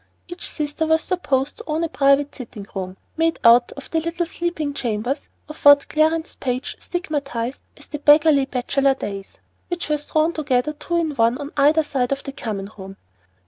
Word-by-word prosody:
Each 350 0 -4
sister 300 +1 -2
was 320 0 +3
supposed 285 -7 -1
to - - -9
own 315 +1 -1
a - - +1
private 280 -2 +2
sitting 230 -6 -9
room, 185 -1 -5 0.2
made 325 0 +1
out 240 +1 +6
of 275 - -11
the 325 - +2
little 335 +2 -2
sleeping 335 -4 -3
chambers 245 +2 -3 0.2
of 305 - -11
what 285 0 +7
Clarence 315 +1 +1
Page 255 0 -3
stigmatized 280 -8 -3 0.2
as - - -12
the 295 - -6
"beggarly 295 -1 +5
bachelor 270 +1 +1
days," 200 -5 -7 0.3
which 350 -3 -4
were 300 - +2
thrown 310 +3 0
together 295 -2 0
two 340 +3 -3
in 325 -2 0
one 235 -2 +2
on 285 0 -7
either 300 +3 +4
side 260 -4 -1
the 275 0 -3
common 210 -6 -5
room. 195 0 -9
285 Hz, 180 wpm, -22 LUFS, 250-315 Hz, 0.3 s, what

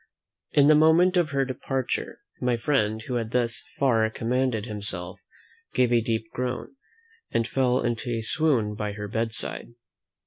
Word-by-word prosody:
In 145 -1 +6
the 155 - +7
moment 160 +4 +5
of 175 -4 +2
her 135 -1 +1
departure, 130 0 -3 0.2
my 125 -1 +1
friend, 110 -4 0
who 125 +1 -2
had 115 -2 -3
thus 120 -1 -1
far 115 -5 +3
commanded 120 -1 -1
himself, 100 -4 -3 0.6
gave 125 -1 +3
a 120 - +4
deep 115 -1 -1
groan, 125 - -4 0.5
and 115 0 0
fell 130 -1 +1
into 120 +1 -2
a 115 -1 -1
swoon 125 -5 +1
by 105 -1 -3
her 105 0 -6
bedside. 115 0 -2
120 Hz, 150 wpm, -26 LUFS, 110-135 Hz, 0.6 s, the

